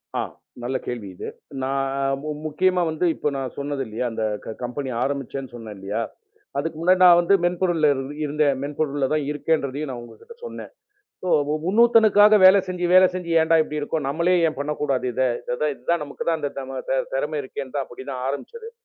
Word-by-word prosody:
அ. - - +1 0.4
நல்ல 130 +2 -1
கேள்வி 120 -5 -5
இது. - - -7 0.4
நான் 135 +1 0 0.3
மு 155 - -5 0.2
முக்கியமா 180 +4 +2
வந்து 160 +3 -1
இப்போ - - -1
நான் 135 -2 -4
சொன்னது 140 -1 -3
இல்லையா? 110 +3 -3
அந்தக் 110 -2 -3
கம்பெனி 130 +3 -4
ஆரம்பிச்சேன்னு 135 -1 -3
சொன்னேன் 110 -3 -8
இல்லையா? 95 +1 -3 0.6
அதுக்கு 155 +2 -2
முன்னாடி 185 +2 +4
நான் 175 -1 +8
வந்து 175 +3 +3
மென்பொருள்ல 175 -3 +2 0.4
இருந்தேன். 150 -1 +1
மென்பொருள்ல 145 -1 -1
தான் 155 -2 0
இருக்கேன்றதையும் 150 -1 -1
நான் 125 -2 -5
உங்ககிட்ட 120 - -14
சொன்னேன். - - -8 1.0
இன்னொருத்துனுக்காக 215 -1 +6
வேலை 190 +1 +8
செஞ்சி 180 -1 -2
வேலை 185 0 +8
செஞ்சி 180 -2 -4
ஏண்டா 165 +1 +4
இப்படி 150 0 -4
இருக்கே? 150 +2 -2
நம்மளே 170 +5 +2
ஏன் 155 - -10
பண்ணக்கூடாது? 145 -3 -1
இதான் 125 +3 -1
இதான் 170 +6 -1
நமக்குத் 145 +3 -4
தான் 165 -1 +1
இந்தத் 135 -2 -3
திறமை 150 +3 -1
இருக்கு. 135 0 -7 0.2
அப்படி 120 - -10
தான் 125 -1 -4
ஆரம்பிச்சது. 450 - -6
145 Hz, 160 wpm, -23 LUFS, 130-170 Hz, 1.0 s, நான்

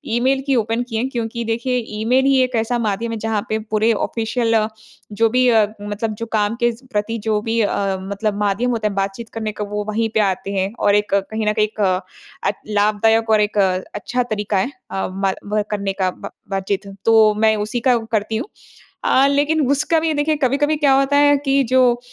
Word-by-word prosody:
Email 265 +2 +2
की 270 - +2
open 230 +1 0
की 225 - -5
हैं 255 +4 -1
क्योंकि 235 -1 -3
देखिए, 235 +3 -1 0.2
ईमेल 255 +4 +2
ही 270 -1 +4
एक 255 -1 -2
ऐसा 230 +2 0
माध्यम 225 +1 -1
है 225 - -3
जहाँ 220 -1 -1
पे 220 - 0
पूरे 220 +2 +3
ऑफिशियल 230 +2 -1 0.6
जो 225 +1 +3
भी 250 +1 +3
अ, 220 -2 +5 0.2
मतलब 205 +2 -3
जो - - -1
काम 210 +1 +1
के 240 0 +3
स 245 +4 -17
प्रति 210 +2 -1
जो 215 -1 +2
भी 230 +1 -1
अ, 195 -2 0
मतलब 200 +2 -2
माध्यम 210 +5 0
होता 220 -2 0
है 200 - -3
बातचीत 195 +4 -3
करने 220 -1 -3
का, 210 0 -5
वो 210 0 -3
वहीं 225 +1 0
पे - - +4
आते 195 -1 0
हैं, 190 +1 -1
और 205 0 +3
एक 210 -1 0
कहीं 215 +2 -2
न 210 - +3
कहीं 215 -1 +2
एक 215 0 -7
अ, 185 -2 +2 0.5
अच 200 - 0
लाभदायक 215 +2 +2
और 215 -1 +4
एक 210 0 -1 0.4
अच्छा 250 0 -1
तरीका 210 -3 -2
है 245 +9 0 0.2
अ, 195 - -2
मा 190 0 -1 0.2
वह 210 - +3
करने 200 -2 -1
का, 190 -1 0
ब - - -9 0.2
बातचीत। 195 +1 -2 0.2
तो 220 -2 +5
मैं 220 0 +4
उसी 240 +3 -3
का 245 - +5
व 225 -1 -3
करती 220 0 0
हूँ। 255 - -4 0.6
अ, 270 +1 +4
लेकिन 295 +2 +2
उसका 305 +3 +2
भी 325 - -1
ये 315 - +1
देखिए 300 +1 +1
कभी-कभी 290 +4 +2
क्या 285 -3 +3
होता 275 +1 +1
है 290 0 +5
कि 275 0 +3
जो 260 0 +5
अ, - - -16
225 Hz, 220 wpm, -19 LUFS, 205-245 Hz, 0.6 s, अ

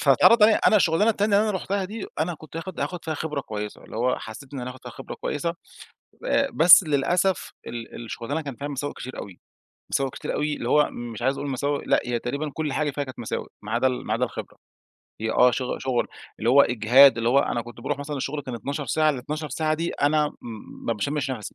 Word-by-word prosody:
فاتعرض 230 -2 +6
عليَّا 215 0 +7
أنا 215 - +6
الشغلانة 200 +4 +3
التانية 205 -1 +2
اللي 215 +1 +3
أنا 195 - -1
رُحتها 195 +1 -2
دي، 210 +2 -6
أنا 170 +2 0
كنت 155 +1 -12
هاخد 175 +2 -6
هاخد 180 -2 -3
فيها 160 - -2
خبرة 150 -2 -3
كويسة، 105 -4 -6
اللي - - -9
هو 125 +2 +1
حسّيت 130 +5 -10
إنّ - - -4
ز 125 - -5
هاخد 125 0 -9
فيها - - -8
خبرة - - -8
كويسة 170 +3 -3 0.7
آآ، 275 - +2
بس 170 +4 +9
للأسف 165 +5 +1
ال 120 0 -7
الشغلانة 120 +6 -4
كان 140 -4 -6
فيها 145 +1 -5
مساوئ 145 0 -3
كتير 130 - -8
أوي، 95 -3 -9 0.5
مساوئ 135 -1 0
كتير - - -5
أوي، 150 0 0
اللي 120 - -4
هو 150 +2 +4
مش 120 -1 -7
عايز 135 +2 +1
أقول 145 - -3
مساوئ، 140 +2 -1
لأ، - - +3
هي 120 -1 0
تقريبًا 140 +6 -3
كل 155 -3 -2
حاجة 150 -1 0
فيها 145 +1 -3
كانت 130 -2 -10
مساوئ، 115 - -4
ما 105 +1 -6
عدا 125 +2 +2
ال 130 -1 -1
ما - - -1
عدا - - +1
الخبرة - - -7 0.6
هي 110 - -1
آه، 125 +2 +5
شغ 125 +1 -2
شغل، 130 -2 -1 0.3
اللي 115 - +1
هو 140 +2 +8
إجهاد، 125 +4 +6
اللي 115 - +1
هو 130 +3 +5
أنا 120 -4 0
كنت 120 0 -12
باروح 135 - -2
مثلًا 145 +1 -4
الشغل 140 +2 -3
كان 130 -2 -6
12 140 +4 -4
ساعة، 155 +5 +3
ال12 150 +3 -4
ساعة 155 +3 0
دي 165 +2 -2
أنا 150 +1 +2
م 115 -6 -11
ما 115 - +2
باشمش 135 +6 -2
نفَسَي. 110 -6 -6
140 Hz, 230 wpm, -25 LUFS, 120-155 Hz, 0.7 s, بس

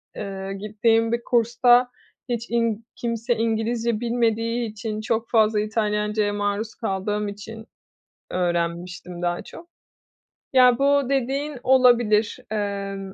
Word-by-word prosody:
eee, 195 -1 -5
gittiğim 220 +3 +1
bir 235 0 -1
kursta 245 +1 +3 0.4
hiç 235 -1 -3
in 230 -1 0
kimse 235 0 -1
İngilizce 225 0 0
bilmediği 230 0 0
için 215 0 -5
çok 225 +1 -1
fazla 220 -2 +3
İtalyancaya 210 -1 0
maruz 205 +2 -2
kaldığım 210 -1 -2
için 220 +2 -8 0.7
öğrenmiştim 175 0 -2
daha 175 0 -1
çok. 335 - -12 0.9
Ya, 250 -2 +6
bu 280 -1 +3
dediğin 275 +2 -1
olabilir. 240 -5 +4
Emm, 200 -2 -3
225 Hz, 110 wpm, -23 LUFS, 205-240 Hz, 0.9 s, Ya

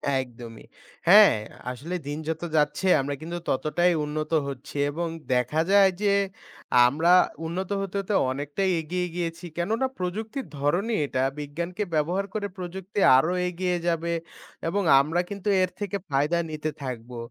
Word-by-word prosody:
একদমই। 120 -3 -6 0.4
হ্যাঁ, 195 - +8 0.3
আসলে 150 +8 -5
দিন 145 +1 -3
যত 160 - -2
যাচ্ছে 150 +5 +1
আমরা 140 +1 -3
কিন্তু 170 +2 -5
ততটাই 175 +6 +2
উন্নত 155 +1 -4 0.2
হচ্ছি 135 0 -8 0.2
এবং 170 +3 -2 0.3
দেখা 125 +6 +1
যায় 200 -1 +6
যে 205 -1 +3 0.7
আমরা 160 +7 +2 0.3
উন্নত 180 +3 -3
হতে 195 0 -5
হতে 195 +2 -3 0.2
অনেকটাই 145 +8 -2
এগিয়ে 180 +3 -2
গিয়েছি। 170 0 -4
কেননা 220 +9 0
প্রযুক্তির 215 +8 -3
ধরনই 180 +11 +1
এটা 130 -2 -1 0.2
বিজ্ঞানকে 170 +7 -4
ব্যবহার 175 +6 0
করে 205 -2 -2
প্রযুক্তি 190 +2 -5 0.2
আরও 160 +7 +2 0.2
এগিয়ে 180 0 -1
যাবে 170 0 0 0.5
এবং 200 +4 0 0.2
আমরা 165 +5 0
কিন্তু 200 0 -6
এর 185 - +2
থেকে 200 -1 -2
ফায়দা 145 +5 +1
নিতে 155 0 -3
থাকবো, 125 -2 -6
170 Hz, 140 wpm, -26 LUFS, 145-190 Hz, 0.7 s, হ্যাঁ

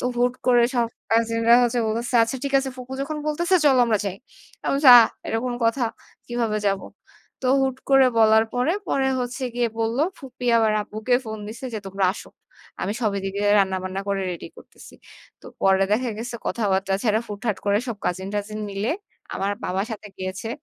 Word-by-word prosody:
তো - - -4
হুট 245 +1 +2
করে 245 -1 +5
সব 235 -1 +2 0.2
কাজিনরা 230 +1 +3
হচ্ছে 240 0 +1
বলতেছে, 235 +3 -2
"আচ্ছা 230 +4 -1
ঠিক 275 - -2
আছে। 270 0 -2
ফুপু 255 0 -9
যখন 295 +3 -3
বলতেছে 340 +5 +1
চল 275 -3 +5
আমরা 220 -3 +1
যাই।" 195 -2 -3 0.5
আমি - - 0
বলছি, 280 -1 +5
"আ - - +11 0.3
এটা 225 - -1
কোনো 245 -1 -2
কথা? 235 +2 +2 0.4
কিভাবে 230 -3 -1
যাবো?" 195 -1 0 0.6
তো 255 - -1
হুট 265 -1 0
করে 270 -1 +6
বলার 220 0 +5 0.4
পরে 265 -1 +1
হচ্ছে 250 +2 -4
গিয়ে 240 -1 +1
বলল, 225 +2 -1 0.2
ফুপি 255 -2 -8
আবার 220 -1 +3
আব্বুকে 215 +4 -1
ফোন 220 0 -6
দিছে 235 +5 -8
যে, - - -2
"তোমরা 195 0 -1
আসো। - - -10 0.5
আমি 200 - -1
সবই 215 -4 0
এদিকে 195 +1 -4 0.2
রান্না-বান্না 190 0 -1
করে 195 -1 0
রেডি 175 - -7
করতেছি।" - - -15 0.5
তো - - -24 0.2
পরে 195 0 +4
দেখা 240 +3 +1
গেছে 240 +1 -5
কথাবার্তা 195 -3 0
ছাড়া 220 -2 +2
হুট-করে 205 -1 -1
সব 230 - -3
কাজীন-টাজীন 205 +4 -3
মিলে 200 +4 -2 0.4
আমার 200 +1 -1
বাবার 190 +3 -1
সাথে 210 -1 -7
গিয়েছে 185 +3 -5
225 Hz, 175 wpm, -23 LUFS, 200-245 Hz, 0.6 s, আ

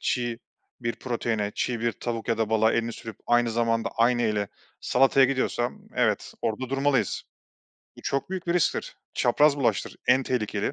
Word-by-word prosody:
çiğ 120 -2 -1 0.4
bir 115 -1 -2
proteine, 110 -4 -2
çiğ 120 -2 -1
bir 115 -1 +1
tavuk 115 -1 -4
ya 115 -1 +1
da 110 -1 0
balığa 110 0 +4
elini 115 0 0
sürüp 115 -2 -8
aynı 120 -1 +3
zamanda 115 0 +1
aynı 120 +1 +3
eli 105 -2 0 0.3
salataya 135 +1 +4
gidiyorsa, 130 -2 0 0.2
evet - - 0
orada 120 +3 -2
durmalıyız. 135 -5 +1 0.7
Bu - - -13
çok 140 +6 -2
büyük 185 -2 -4
bir 170 - +1
risktir. 175 - 0 0.2
Çapraz 145 +4 +4
bulaştır, 115 -7 0
en 130 +2 +5
tehlikeli 105 -5 -1
120 Hz, 160 wpm, -26 LUFS, 115-130 Hz, 0.7 s, en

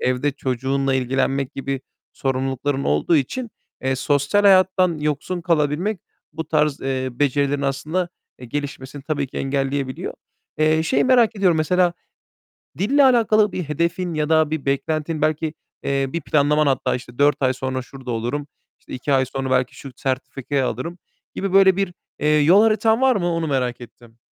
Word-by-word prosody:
evde 130 +3 +1
çocuğunla 135 0 -1
ilgilenmek 135 +1 0
gibi 135 -1 -3 0.3
sorumlulukların 135 +1 -2
olduğu 75 - +2
için, 230 - -2 0.3
eee, 130 0 0
sosyal 145 +9 +1
hayattan 185 -3 +4
yoksun 150 +4 -2
kalabilmek 165 +4 0 0.3
bu 160 +1 -4
tarz, 150 -2 +1
eee, 130 -1 -2
becerilerin 140 +1 0
aslında, 155 +6 -1 0.3
eee, 125 - -10
gelişmesini 140 +1 -6
tabii 145 -2 -2
ki - - -12
engelleyebiliyor. 135 -1 -2 0.4
Eee, 155 +1 +3
şeyi 215 - +1
merak 240 -4 +4
ediyorum; 185 -4 +3
mesela, 175 +3 +2 0.9
dille 275 +9 +3
alakalı 220 -5 +4
bir 180 - -3
hedefin 170 +3 -1
ya 155 0 -1
da 160 -1 +3
bir 155 -3 -3
beklentin 150 +3 -1
belki, 155 0 0 0.3
eee, 140 0 0
bir 170 - -2
planlaman 150 +1 +2
hatta, 135 -1 +1
işte, 120 -1 -9
"4 145 +1 +3
ay 130 -1 +2
sonra 130 0 -3
şurada 130 0 -9
olurum." 120 +6 -3 0.3
işte, - - -12
"2 135 +3 -2
ay 130 -1 +3
sonra 135 0 -4
belki 130 -1 +1
şu 135 - -10
sertifikayı 135 +1 -2
alırım." 170 +10 -4 0.4
gibi 195 -1 -3
böyle 190 -1 +6
bir, 195 -3 -1 0.3
eee, 150 - 0
yol 180 +8 +6
haritan 220 +1 +3
var 265 -1 +4
mı? 180 -4 0
Onu 165 -1 -1
merak 125 -3 -1
ettim. 120 -1 -14
145 Hz, 160 wpm, -21 LUFS, 135-175 Hz, 0.9 s, böyle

